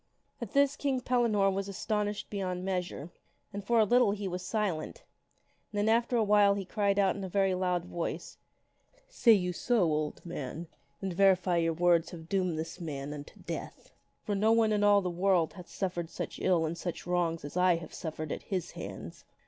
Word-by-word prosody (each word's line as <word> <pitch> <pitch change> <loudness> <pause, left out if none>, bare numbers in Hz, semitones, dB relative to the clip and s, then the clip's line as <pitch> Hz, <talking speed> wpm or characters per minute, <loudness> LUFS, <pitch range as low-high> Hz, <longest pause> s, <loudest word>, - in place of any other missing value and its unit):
" - - -41
At 230 -4 -6
this 280 0 +4
King 275 -3 0
Pellinore 230 -6 +2
was 195 +1 -3
astonished 210 +1 -2
beyond 185 -3 -3
measure. 180 -4 -3 0.4
And 200 0 -5
for 235 +4 +2
a - - +7
little 240 -1 +4
he 205 -1 -4
was 180 0 -4
silent, 210 - -2 0.7
and 210 - -5
then 205 +1 +1
after 235 +2 +2
awhile 205 -2 +4
he 200 -1 -4
cried 200 0 0
out 195 -2 +3
in 200 - -6
a 190 - -4
very 195 0 +2
loud 180 -1 0
voice, 170 -2 -5 0.4
" - - -42 0.2
Say 245 - +5
you 180 -3 +1
so, 235 +3 +1
old 155 -1 -1
man? 165 -1 -5 0.4
Then 190 -2 -3
verily 180 -2 +3
your 165 - +1
words 170 0 +3
have 160 -2 -10
doomed 185 -4 0
this 165 +3 -5
man 145 -3 -5
unto 145 -1 -10
death. - - -7 0.3
For 210 - -2
no 210 +3 +3
one 225 -1 +4
in 205 0 +1
all 205 -1 +6
this 180 -2 -3
world 180 -2 +2
hath 180 -2 -10
ever - - -22
suffered 175 -4 -3
such - - -6
ill 175 -3 +2
and 160 +2 -2
such 175 0 -5
wrongs 170 -3 0
as 145 - -8
I 180 -1 +4
have 165 0 -8
suffered 155 -2 -5
at - - -3
his 185 -4 -3
hands. 95 -2 -8
185 Hz, 205 wpm, -30 LUFS, 170-205 Hz, 0.7 s, a